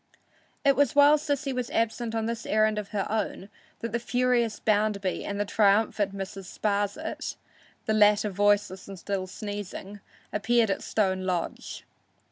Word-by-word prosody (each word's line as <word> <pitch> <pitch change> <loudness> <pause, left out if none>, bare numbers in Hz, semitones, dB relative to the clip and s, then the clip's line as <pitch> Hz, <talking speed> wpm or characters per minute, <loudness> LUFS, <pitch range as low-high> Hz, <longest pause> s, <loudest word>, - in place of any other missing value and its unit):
It 275 -1 +5
was 285 -3 +2
while 290 +1 +7
Sissy 285 -2 -2
was 250 -1 -3
absent 230 0 -1
on 225 -1 0
this 230 0 -4
errand 215 0 +2
of 210 - -6
her 200 -2 -2
own 210 -2 -3 0.3
that 230 - -3
the 235 - 0
furious 245 -2 +1
Bounderby 205 -3 0
and 200 0 -4
the 205 - +1
triumphant 205 -1 +2
Mrs. 195 0 -6
Sparsit, 205 -1 -2 0.5
the 220 - +1
latter 210 0 +4
voiceless 205 -1 +1
and 195 -1 -8
still 190 +1 -3
sneezing, 205 0 -7 0.3
appeared 220 +1 +2
at - - -2
Stone 190 -3 0
Lodge. 180 -2 -3
210 Hz, 150 wpm, -27 LUFS, 200-230 Hz, 0.5 s, while